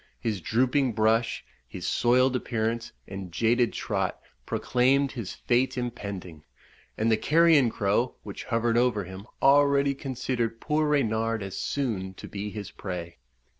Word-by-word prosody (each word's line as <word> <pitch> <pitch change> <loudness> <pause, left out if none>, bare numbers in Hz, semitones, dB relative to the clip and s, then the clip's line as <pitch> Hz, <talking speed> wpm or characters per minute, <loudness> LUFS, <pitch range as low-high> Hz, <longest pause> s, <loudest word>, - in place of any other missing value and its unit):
His 105 - -2
drooping 125 - +1
brush, 110 +1 +1 0.2
his 90 - -7
soiled 125 +4 +3
appearance, 115 -1 -2 0.2
and 95 -2 -7
jaded 115 +6 +2
trot, - - -2 0.3
proclaimed 135 +3 +2
his 105 -8 -6
fate 125 +2 +1
impending; 100 -9 -5 0.5
and 110 +1 +2
the 110 - +4
carrion 155 0 +4
crow, 105 +4 0
which - - -7
hovered 115 -1 +1
over 120 -5 +2
him, 95 +3 -9 0.2
already 140 0 +5
considered 130 -4 -3
poor 155 0 +1
Reynard 115 -6 +1
as 95 -1 -6
soon 100 -9 -2
to - - -9
be 105 +1 -5
his 105 -1 -7
prey. 85 -5 -6
115 Hz, 135 wpm, -27 LUFS, 100-130 Hz, 0.5 s, already